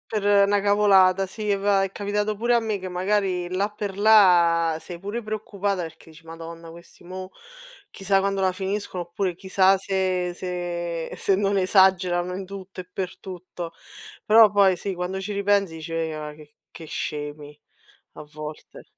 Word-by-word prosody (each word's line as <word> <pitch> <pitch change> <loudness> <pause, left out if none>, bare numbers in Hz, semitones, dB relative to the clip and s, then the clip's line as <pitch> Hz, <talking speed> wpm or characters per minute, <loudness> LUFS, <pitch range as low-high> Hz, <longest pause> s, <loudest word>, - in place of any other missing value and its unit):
Per 205 -1 +4
na 205 0 +2
cavolata, 195 -2 +4
sì, 205 +2 -2
va 195 0 +2
è 195 - -3
capitato 210 +1 -2
pure 240 +4 +1
a 235 - +5
me 220 -3 -2
che 185 0 -6
magari 185 -1 0
là 190 +3 -1
per 205 -2 -6
là 175 -6 +5
sei 175 -2 -8
pure 205 +5 -5
preoccupata 205 -3 -3
perché 165 0 -11
dici: 165 +1 -17
"Madonna 165 0 -9
questi, 170 +1 -15
mo, 185 +1 -8 0.6
chissà 195 0 +1
quando 195 0 -1
la 190 -1 +2
finiscono" 190 -1 -4
oppure 175 +1 -3
"chissà 190 +1 +3
se 185 -2 -1
se 175 -2 -4
se 195 - +1
non 200 0 +1
esagerano 185 -2 +3
in 190 0 -6
tutto 190 -1 -8
e 180 - -18
per 185 0 -5
tutto." 180 -2 -8 0.5
Però 220 -1 +7
poi, 200 -2 +4
sì, 190 +2 -5
quando 180 +2 -4
ci 200 +2 -5
ripensi 200 -3 +1
dici: 160 +1 -7
"Ma 155 -2 -3
che 150 0 -17 0.2
che 165 - -11
scemi", 150 -1 -6 0.6
a - - -10
volte. 150 0 -10
190 Hz, 165 wpm, -24 LUFS, 175-200 Hz, 0.6 s, Però